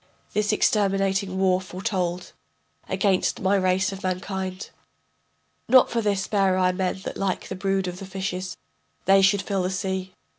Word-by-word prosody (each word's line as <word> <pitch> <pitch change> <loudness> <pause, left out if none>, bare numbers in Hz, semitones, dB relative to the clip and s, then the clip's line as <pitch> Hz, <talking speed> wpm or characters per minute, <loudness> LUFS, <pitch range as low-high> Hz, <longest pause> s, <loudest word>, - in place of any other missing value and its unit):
This 210 0 +1
exterminating 195 -2 +1
war 185 -1 +2
foretold 185 -2 -3 0.6
Against 195 -3 +1
my 195 +1 +2
race 185 0 +2
of 195 0 -7
mankind. 185 0 -4 1.0
Not 255 +1 +6
for 230 - +1
this 200 -3 0
bare 195 -3 +2
I 185 -1 +3
men 185 0 -2
that - - -5
like 195 -2 -2
the 190 - -4
brood 195 0 0
of 180 0 -5
the 195 - -8
fishes 190 -1 -4 0.5
They 195 0 +6
should 195 0 +3
fill 195 -1 -1
the 180 - 0
sea. 190 -1 -3
190 Hz, 155 wpm, -24 LUFS, 185-195 Hz, 1.0 s, Not